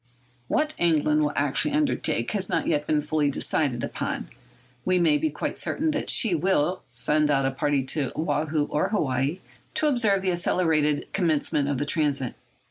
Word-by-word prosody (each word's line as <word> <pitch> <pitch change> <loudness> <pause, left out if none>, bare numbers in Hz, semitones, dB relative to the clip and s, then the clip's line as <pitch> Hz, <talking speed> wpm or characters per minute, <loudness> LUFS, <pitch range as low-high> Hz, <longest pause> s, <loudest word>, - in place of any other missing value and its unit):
What 305 0 0
England 155 -2 +2
will 150 -1 +1
actually 145 - +1
undertake 290 - 0
has 195 -3 -3
not - - 0
yet 150 -2 0
been 150 -1 +1
fully 150 -1 0
decided 135 -3 -1
upon. - - -4 0.5
We 185 0 +2
may 160 -4 +3
be 155 - 0
quite 150 - -4
certain 315 +2 -1
that 290 - -2
she 225 -7 +4
will 180 +1 +1
send 150 0 +1
out 135 -2 +2
a 135 - +1
party 140 0 0
to 135 0 -1
Woahoo 155 -1 0
or 150 +6 0
Hawaii 140 - -1 0.3
to - - +2
observe 220 -9 +2
the 185 - +1
accelerated 160 -4 +1
commencement 150 -5 +1
of 140 - -1
the 145 - -1
transit. 145 -4 0
155 Hz, 170 wpm, -25 LUFS, 145-185 Hz, 0.5 s, she